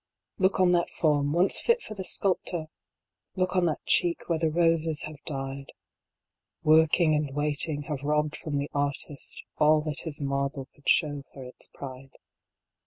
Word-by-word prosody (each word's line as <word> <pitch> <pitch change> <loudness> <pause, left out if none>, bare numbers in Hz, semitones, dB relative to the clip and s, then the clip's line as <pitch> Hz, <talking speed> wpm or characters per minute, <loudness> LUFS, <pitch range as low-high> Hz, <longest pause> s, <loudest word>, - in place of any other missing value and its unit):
T 185 - +3
OOK 190 - -4
on 185 -1 +5
that 175 -1 +2
form, 145 -3 +1
once 175 +5 +5
fit 470 +1 +2
for - - -7
the 195 -3 -6
sculptor! 180 -4 0 0.7
Look 185 0 0
on 180 -1 +3
that 155 -3 -2
cheek, 175 -1 +2
where 165 -2 0
the 160 -1 +1
roses 165 -1 +1
have 155 -1 -8
died 135 -2 -4 0.9
1 155 0 +6
Working 160 0 +3
and 150 -1 0
waiting 145 0 -1
have 145 -2 -5
robbed 150 +1 0
from 145 -3 -4
the 140 +1 -3
artist 140 0 -3 0.2
All 155 0 +5
that 150 -2 -2
his 155 -3 -4
marble 140 -1 -2
could 145 - -5
show 145 -4 +2
for 135 - -10
its 125 0 -3
pride. 135 -1 -10
150 Hz, 175 wpm, -27 LUFS, 145-170 Hz, 0.9 s, 1